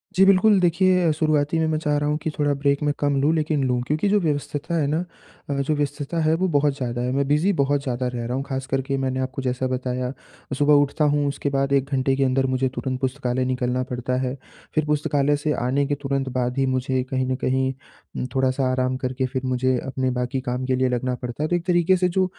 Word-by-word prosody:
जी, 190 Hz, -, +6 dB
बिल्कुल 195 Hz, +1 st, +5 dB
देखिए 180 Hz, -1 st, +3 dB
शुरुआती 155 Hz, 0 st, +1 dB
में 160 Hz, -, +2 dB
मैं 155 Hz, 0 st, 0 dB
चाह 150 Hz, -2 st, 0 dB
रहा 145 Hz, 0 st, 0 dB
हूँ 150 Hz, -, +1 dB
कि 160 Hz, -, 0 dB
थोड़ा 145 Hz, -1 st, +2 dB
ब्रेक 140 Hz, 0 st, 0 dB
में 145 Hz, -1 st, +1 dB
कम 145 Hz, -1 st, +1 dB
लूँ 155 Hz, +3 st, +3 dB
लेकिन 150 Hz, -3 st, 0 dB
लूँ, 125 Hz, -1 st, 0 dB
क्योंकि 155 Hz, +7 st, +1 dB
जो 210 Hz, 0 st, +4 dB
व्यवस्थता 150 Hz, 0 st, -2 dB
है 155 Hz, -3 st, +1 dB
ना 160 Hz, +4 st, 0 dB, 0.5 s
अ, -, -, 0 dB
जो 140 Hz, +2 st, 0 dB
व्यस्तता 145 Hz, +2 st, -2 dB
है 155 Hz, +1 st, +3 dB
वो 185 Hz, +2 st, 0 dB
बहुत 145 Hz, -2 st, +2 dB
ज़्यादा 120 Hz, -2 st, -3 dB
है। 125 Hz, +1 st, -1 dB
मैं 140 Hz, 0 st, 0 dB
बिज़ी 155 Hz, +7 st, +3 dB
बहुत 140 Hz, -2 st, +1 dB
ज़्यादा 125 Hz, -2 st, -2 dB
रह 120 Hz, -1 st, -4 dB
रहा 125 Hz, +2 st, -2 dB
हूँ 135 Hz, -, -2 dB
ख़ास 135 Hz, -1 st, -3 dB
करके 135 Hz, 0 st, -1 dB
मैंने 130 Hz, -1 st, -1 dB
आपको 130 Hz, +1 st, -3 dB
जैसा 130 Hz, 0 st, -1 dB
बताया, 125 Hz, 0 st, -2 dB, 0.5 s
सुबह 150 Hz, 0 st, +4 dB
उठता 150 Hz, +2 st, 0 dB
हूँ 145 Hz, -1 st, +1 dB
उसके 140 Hz, 0 st, -2 dB
बाद 135 Hz, 0 st, 0 dB
1 135 Hz, 0 st, +2 dB
घंटे 135 Hz, 0 st, +2 dB
के 135 Hz, -, +1 dB
अंदर 135 Hz, 0 st, +2 dB
मुझे 130 Hz, 0 st, 0 dB
तुरंत 130 Hz, -1 st, -3 dB
पुस्तकालय 130 Hz, -1 st, -1 dB
निकलना 125 Hz, 0 st, -1 dB
पड़ता 125 Hz, 0 st, -2 dB
है 130 Hz, +1 st, -2 dB, 0.4 s
फिर 155 Hz, -1 st, +2 dB
पुस्तकालय 145 Hz, -1 st, +1 dB
से 150 Hz, +1 st, -1 dB
आने 140 Hz, +3 st, +1 dB
के 145 Hz, -, 0 dB
तुरंत 135 Hz, -1 st, -1 dB
बाद 125 Hz, +1 st, -1 dB
ही 135 Hz, -, +2 dB
मुझे 130 Hz, 0 st, 0 dB
कहीं 130 Hz, -1 st, 0 dB
न -, -, +1 dB
कहीं 130 Hz, +1 st, +1 dB, 0.4 s
उम, -, -, -2 dB
थोड़ा-सा 130 Hz, 0 st, +1 dB
आराम 130 Hz, 0 st, 0 dB
करके 130 Hz, 0 st, -2 dB
फिर 130 Hz, 0 st, -3 dB
मुझे 130 Hz, 0 st, +1 dB
अपने 130 Hz, -1 st, -1 dB
बाकी 125 Hz, +2 st, -2 dB
काम 125 Hz, 0 st, -3 dB
के 130 Hz, 0 st, +1 dB
लिए 130 Hz, 0 st, +1 dB
लगना 125 Hz, +1 st, -1 dB
पड़ता 125 Hz, +4 st, -4 dB
है। 155 Hz, -, -1 dB
तो 175 Hz, -, +2 dB
एक 175 Hz, 0 st, -3 dB
तरीके 175 Hz, +1 st, +3 dB
से 180 Hz, 0 st, +2 dB
जो 185 Hz, +1 st, +2 dB
135 Hz, 240 wpm, -23 LUFS, 130-150 Hz, 0.5 s, जी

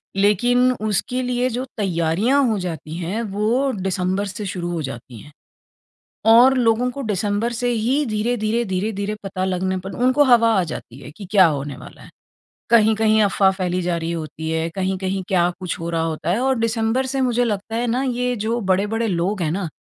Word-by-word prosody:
लेकिन 240 Hz, +6 st, +3 dB
उसके 215 Hz, +2 st, -2 dB
लिए 250 Hz, 0 st, 0 dB
जो 250 Hz, +2 st, -3 dB
तैयारियाँ 195 Hz, -, +1 dB
हो 220 Hz, -2 st, 0 dB
जाती 160 Hz, -3 st, -5 dB
हैं 180 Hz, +6 st, -3 dB
वो 235 Hz, +7 st, +1 dB
दिसंबर 190 Hz, +1 st, -1 dB
से 205 Hz, +2 st, -6 dB
शुरू 175 Hz, -2 st, -4 dB
हो 170 Hz, -2 st, -2 dB
जाती 120 Hz, -3 st, -8 dB
है। 150 Hz, -, -14 dB, 1.0 s
और 240 Hz, +4 st, +7 dB
लोगों 240 Hz, +1 st, +2 dB
को 275 Hz, +3 st, -6 dB
डिसेंबर 205 Hz, +4 st, -1 dB
से 245 Hz, +1 st, -2 dB
ही 245 Hz, +6 st, +1 dB
धीरे-धीरे 220 Hz, +1 st, -1 dB
धीरे-धीरे 200 Hz, +2 st, -2 dB
पता 185 Hz, -1 st, -3 dB
लगने 185 Hz, 0 st, -1 dB
पर 195 Hz, -, -5 dB
उनको 260 Hz, +3 st, +4 dB
हवा 230 Hz, -1 st, +5 dB
आ -, -, +1 dB
जाती 125 Hz, -, -9 dB
है 135 Hz, -, -10 dB
कि 200 Hz, -, -9 dB
क्या 195 Hz, -3 st, +6 dB
होने 145 Hz, -3 st, -3 dB
वाला -, -, -13 dB
है। -, -, -14 dB, 0.6 s
कहीं-कहीं 220 Hz, -1 st, +4 dB
अफ़वाह 195 Hz, -1 st, +3 dB
फ़ैली 185 Hz, -1 st, -2 dB
जा 175 Hz, 0 st, -1 dB
रही 165 Hz, 0 st, -3 dB
होती 160 Hz, -1 st, -5 dB
है, 160 Hz, +1 st, -1 dB
कहीं-कहीं 190 Hz, 0 st, -2 dB
क्या 175 Hz, -3 st, +3 dB
कुछ 180 Hz, -2 st, -4 dB
हो 165 Hz, -, -4 dB
रहा 165 Hz, -1 st, 0 dB
होता 160 Hz, 0 st, -2 dB
है 205 Hz, -, +1 dB
और 265 Hz, -1 st, +1 dB
डिसेंबर 230 Hz, +3 st, 0 dB
से 270 Hz, +1 st, -2 dB
मुझे 245 Hz, -1 st, +2 dB
लगता 220 Hz, 0 st, -3 dB
है 240 Hz, +1 st, 0 dB
ना 245 Hz, +3 st, 0 dB
ये 250 Hz, -1 st, -1 dB
जो 230 Hz, +2 st, 0 dB
बड़े-बड़े 205 Hz, +3 st, 0 dB
लोग 185 Hz, +1 st, -1 dB
हैं 155 Hz, -, 0 dB
ना, 180 Hz, -2 st, -2 dB
205 Hz, 190 wpm, -21 LUFS, 180-235 Hz, 1.0 s, और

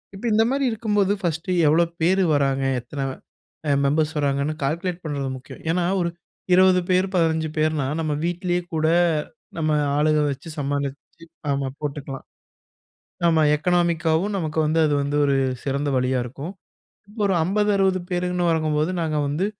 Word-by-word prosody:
இப்ப 200 Hz, -, -8 dB
இந்த 220 Hz, +1 st, +5 dB
மாரி 275 Hz, 0 st, +1 dB
இருக்கும்போது 210 Hz, -3 st, +1 dB
ஃபர்ஸ்ட்டு 170 Hz, +1 st, -2 dB, 0.2 s
எவ்வளோ 165 Hz, +3 st, +4 dB, 0.2 s
பேரு 190 Hz, +3 st, +3 dB
வராங்க. 135 Hz, -1 st, +1 dB, 0.2 s
எத்தன 135 Hz, +2 st, -5 dB, 0.6 s
அ, -, -, +1 dB, 0.2 s
மெம்பர்ஸ் 155 Hz, +3 st, +1 dB
வராங்கன்னு 140 Hz, +1 st, 0 dB
கால்குலேட் 170 Hz, +5 st, -2 dB
பண்றது 140 Hz, -3 st, -2 dB
முக்கியம். 130 Hz, -, -12 dB
ஏன்னா, 175 Hz, +1 st, +1 dB, 0.2 s
ஒரு 170 Hz, -, 0 dB, 0.4 s
20 185 Hz, 0 st, +5 dB
பேர் 185 Hz, +1 st, +3 dB
15 160 Hz, -2 st, +2 dB
பேர்னா 155 Hz, -3 st, +1 dB
நம்ம 155 Hz, -2 st, -1 dB
வீட்லே 175 Hz, 0 st, -1 dB
கூட 155 Hz, 0 st, +1 dB, 0.7 s
நம்ம 155 Hz, -1 st, 0 dB, 0.3 s
ஆளுக 155 Hz, 0 st, +3 dB
வச்சு 140 Hz, +5 st, -8 dB
சமாளிச்சி 145 Hz, +3 st, -4 dB, 0.2 s
ஆமா 140 Hz, -1 st, 0 dB
போட்டுக்கலாம். 140 Hz, -2 st, -5 dB, 1.0 s
நம்ம 165 Hz, -2 st, +4 dB
எக்கனாமிக்காவும் 170 Hz, +3 st, +1 dB
நமக்கு 160 Hz, -3 st, -2 dB
வந்து, 155 Hz, +2 st, +1 dB
அது 150 Hz, -, 0 dB
வந்து 145 Hz, +1 st, -1 dB
ஒரு 140 Hz, -1 st, +2 dB, 0.3 s
சிறந்த 140 Hz, +1 st, -1 dB
வழியா 125 Hz, +1 st, +1 dB
இருக்கும். 140 Hz, +9 st, -7 dB, 0.5 s
இப்போ 210 Hz, +2 st, -7 dB
ஒரு 190 Hz, -, +1 dB
50 205 Hz, +4 st, +1 dB
60 190 Hz, -1 st, +2 dB
பேருன்னு 180 Hz, 0 st, 0 dB
வரங்கம்போது 155 Hz, 0 st, +1 dB
நாங்க 155 Hz, -2 st, -1 dB
வந்து 155 Hz, +7 st, -1 dB
160 Hz, 145 wpm, -23 LUFS, 145-180 Hz, 1.0 s, இந்த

